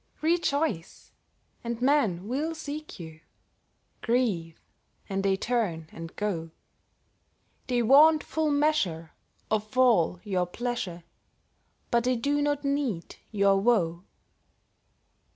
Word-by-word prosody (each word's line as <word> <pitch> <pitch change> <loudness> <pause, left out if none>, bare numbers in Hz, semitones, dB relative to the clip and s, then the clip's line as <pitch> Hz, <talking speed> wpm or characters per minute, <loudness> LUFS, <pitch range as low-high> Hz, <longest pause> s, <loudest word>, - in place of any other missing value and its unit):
Rejoice, 310 - -1 0.5
and 235 -1 -4
men 245 -9 +1
will 300 +7 -2
seek 305 -3 -7
you; 160 -2 -9 0.8
Grieve, 210 -10 0 0.5
and 195 0 -2
they 195 -1 +1
turn 195 -10 -2
and 165 0 -9
go; 175 -6 -3 1.2
They 245 -2 +1
want 300 +6 +6
full 315 -1 -1
measure 285 - 0 0.4
of 215 +2 -2
all 220 -9 +4
your 185 -4 -1
pleasure, 190 -5 -4 0.9
But 235 0 +2
they 255 0 +2
do 285 +5 0
not 290 0 -1
need 275 -11 -2
your 200 -2 +3
woe. 180 -7 +1
230 Hz, 105 wpm, -27 LUFS, 180-285 Hz, 1.2 s, want